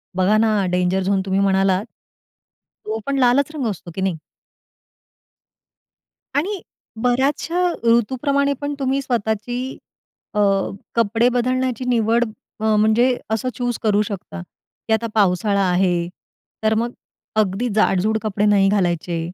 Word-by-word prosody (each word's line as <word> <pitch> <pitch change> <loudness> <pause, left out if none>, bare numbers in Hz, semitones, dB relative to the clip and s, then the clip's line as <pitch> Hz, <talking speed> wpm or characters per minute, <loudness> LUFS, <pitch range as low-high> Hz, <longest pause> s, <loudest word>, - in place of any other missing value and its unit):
बघा 190 +3 +3
ना, 215 -3 +2
danger 180 +1 +1
zone 195 0 +1
तुम्ही 190 0 0
म्हणालात. 195 0 +2 1.0
तो 220 +1 -3
पण 280 0 -1
लालच 260 +3 +3
रंग 270 -6 -1
असतो 180 -3 -7
की 190 - -3
नाही. 190 -3 0 2.2
आणि 370 +7 -1 0.4
बऱ्याचशा 285 +8 +1 0.2
ऋतूप्रमाणे 265 +5 +2
पण 285 0 -2
तुम्ही 270 0 0
स्वतःची 230 -2 -2 0.8
अ, - - +1 0.6
कपडे 230 +1 +2
बदलण्याची 255 0 -1
निवड 230 0 +2 0.4
अ, 220 0 +2
म्हणजे 225 +4 +3
असं 220 +4 -1
चूज 245 -2 -2
करू 210 -1 +3
शकता, 195 - -5
की 220 - -7
"आता 225 +1 +1
पावसाळा 200 0 +2
आहे, 180 -1 +1 0.6
तर 220 0 +3
मग 235 +2 0 0.4
अगदी 215 +2 +1
जाडजूड 215 0 +2
कपडे 210 -1 -1
नाही 200 -2 +4
घालायचे. 175 -4 0
220 Hz, 125 wpm, -21 LUFS, 195-245 Hz, 2.2 s, नाही